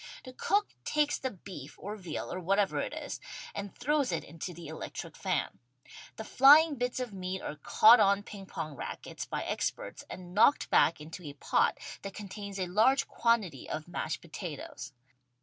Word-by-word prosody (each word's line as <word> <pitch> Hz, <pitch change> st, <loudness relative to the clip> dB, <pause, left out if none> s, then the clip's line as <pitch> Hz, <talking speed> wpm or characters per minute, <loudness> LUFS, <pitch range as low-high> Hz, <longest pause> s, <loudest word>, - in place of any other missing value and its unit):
The 255 Hz, -, -10 dB
cook 405 Hz, +10 st, +1 dB
takes 300 Hz, -1 st, +1 dB
the 260 Hz, -, -2 dB
beef 175 Hz, -, -10 dB
or 205 Hz, +2 st, -6 dB
veal 180 Hz, -7 st, -5 dB
or 185 Hz, -, -3 dB
whatever 195 Hz, +2 st, +1 dB
it -, -, -2 dB
is -, -, -5 dB, 0.3 s
and 200 Hz, -1 st, -5 dB
throws 285 Hz, +1 st, +1 dB
it -, -, -1 dB
into 165 Hz, +2 st, -7 dB
the 170 Hz, 0 st, -10 dB
electric 160 Hz, -, -7 dB
fan. -, -, -2 dB, 0.6 s
The 220 Hz, -, -6 dB
flying 290 Hz, +7 st, +7 dB
bits 250 Hz, -1 st, -2 dB
of 250 Hz, -4 st, -4 dB
meat 185 Hz, 0 st, -4 dB
are -, -, -4 dB
caught 220 Hz, +10 st, +7 dB
on 200 Hz, 0 st, +4 dB
ping 200 Hz, -2 st, -10 dB
pong 155 Hz, -4 st, -5 dB
rackets -, -, -6 dB
by -, -, -3 dB
experts -, -, -3 dB
and 180 Hz, -1 st, -9 dB
knocked 230 Hz, +8 st, +4 dB
back 165 Hz, -, +4 dB
into 160 Hz, +4 st, -8 dB
a 145 Hz, -, -6 dB
pot 140 Hz, -, +1 dB, 0.2 s
that 195 Hz, -1 st, -7 dB
contains 200 Hz, -1 st, -7 dB
a 185 Hz, -, 0 dB
large 220 Hz, +9 st, +3 dB
quantity 215 Hz, -, 0 dB
of 155 Hz, +1 st, -4 dB
mashed 170 Hz, -2 st, -3 dB
potatoes. 155 Hz, -, -7 dB
195 Hz, 175 wpm, -31 LUFS, 175-240 Hz, 0.6 s, flying